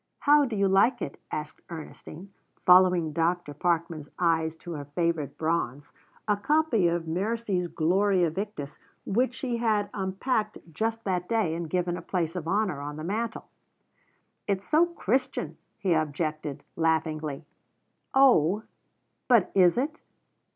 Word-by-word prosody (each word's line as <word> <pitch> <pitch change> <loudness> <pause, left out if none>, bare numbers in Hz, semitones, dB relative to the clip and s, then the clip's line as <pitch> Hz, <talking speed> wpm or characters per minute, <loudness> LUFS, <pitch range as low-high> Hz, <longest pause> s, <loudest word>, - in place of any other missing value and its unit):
"How 290 0 +5
do 240 -4 -4
you 200 -1 +2
like 210 +6 +4
it?" 140 - -7
asked 150 0 -5
Ernestine, 170 +3 -9 0.3
following 180 -3 +5
Dr. 165 -1 0
Parkman's 165 -1 -1
eyes 160 -2 +1
to 170 +2 -10
her 145 -3 -5
favourite 165 -4 -1
bronze, 150 -4 -2 0.3
a 210 - +3
copy 255 - +2
of 170 -1 -1
Mercie's 195 +1 -1
Gloria 180 +1 +2
Victis, 175 -6 -5 0.3
which 250 +5 +1
she 250 -3 -2
had 215 -3 0
unpacked 210 +3 -1 0.2
just 225 +5 -2
that 180 -2 -2
day 220 -8 +1
and 165 -1 -4
given 175 0 -1
a - - -7
place 165 -1 -2
of 170 -3 -4
honour 195 -6 0
on 145 +1 -5
the 155 - -6
mantel. 220 +6 -3 1.0
"It's 195 -1 -1
so 320 +3 +4
Christian," 265 - -2 0.2
he 185 -3 +1
objected 155 -2 -2
laughingly. 160 -2 -1 0.7
"Oh, 215 - +5 0.6
but 235 -7 +4
is 180 +1 +5
it?" 300 +5 -1
180 Hz, 135 wpm, -27 LUFS, 160-215 Hz, 1.0 s, How